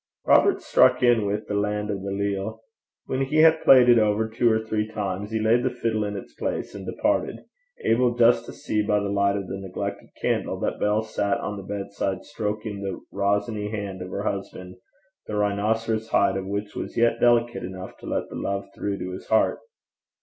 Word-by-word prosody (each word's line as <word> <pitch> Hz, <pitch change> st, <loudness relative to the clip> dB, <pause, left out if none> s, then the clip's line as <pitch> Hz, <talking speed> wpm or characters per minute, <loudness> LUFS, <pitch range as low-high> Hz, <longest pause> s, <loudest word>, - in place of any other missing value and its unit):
Robert -, -, +4 dB
struck -, -, +4 dB
in 120 Hz, -4 st, +4 dB
with 105 Hz, +2 st, -2 dB
The -, -, -3 dB
Lan' 105 Hz, +1 st, -1 dB
o' 100 Hz, -, -3 dB
the 100 Hz, +1 st, -5 dB
Leal. 100 Hz, +2 st, -2 dB, 0.4 s
When 130 Hz, -, -2 dB
he 135 Hz, +3 st, -1 dB
had 160 Hz, 0 st, +5 dB
played 130 Hz, -2 st, +7 dB
it 120 Hz, -1 st, +7 dB
over 110 Hz, +1 st, +2 dB
two 115 Hz, +1 st, +2 dB
or 110 Hz, -, +2 dB
three 110 Hz, -1 st, -1 dB
times, 100 Hz, -2 st, -4 dB
he 110 Hz, 0 st, -1 dB
laid 110 Hz, +3 st, +3 dB
the 130 Hz, -, +1 dB
fiddle 115 Hz, -3 st, -1 dB
in 100 Hz, 0 st, -4 dB
its -, -, -9 dB
place, -, -, -3 dB
and 100 Hz, -2 st, -8 dB
departed 300 Hz, +1 st, -1 dB, 0.4 s
able 120 Hz, +1 st, +3 dB
just 120 Hz, 0 st, +4 dB
to -, -, -6 dB
see, 105 Hz, -, -2 dB
by 105 Hz, 0 st, +1 dB
the 100 Hz, 0 st, -2 dB
light 100 Hz, 0 st, +2 dB
of 100 Hz, -, -4 dB
the 95 Hz, -, -5 dB
neglected 95 Hz, -2 st, -5 dB
candle, -, -, -1 dB
that -, -, -2 dB
Bell 105 Hz, +1 st, +1 dB
sat 105 Hz, -2 st, -1 dB
on 105 Hz, -, -4 dB
the 100 Hz, -, -6 dB, 0.2 s
bedside 100 Hz, -1 st, -3 dB
stroking 105 Hz, -5 st, -4 dB
the 95 Hz, -1 st, -4 dB, 0.2 s
rosiny 105 Hz, +1 st, 0 dB
hand 100 Hz, -3 st, -5 dB
of 90 Hz, -, -6 dB
her 100 Hz, +2 st, -4 dB
husband, 95 Hz, -3 st, -5 dB, 0.5 s
the 105 Hz, -, -4 dB
rhinoceros 110 Hz, +2 st, 0 dB
hide 100 Hz, -, +3 dB
of 95 Hz, -1 st, -3 dB
which 100 Hz, +1 st, -4 dB
was -, -, -5 dB
yet 115 Hz, 0 st, +3 dB
delicate 120 Hz, 0 st, +3 dB
enough 95 Hz, 0 st, -7 dB
to -, -, -11 dB
let -, -, -2 dB
the -, -, -8 dB
love 100 Hz, 0 st, -3 dB
through 100 Hz, -1 st, -3 dB
to 90 Hz, -, -5 dB
his 90 Hz, -, -8 dB
heart. 110 Hz, -, +2 dB
105 Hz, 205 wpm, -25 LUFS, 100-115 Hz, 0.5 s, played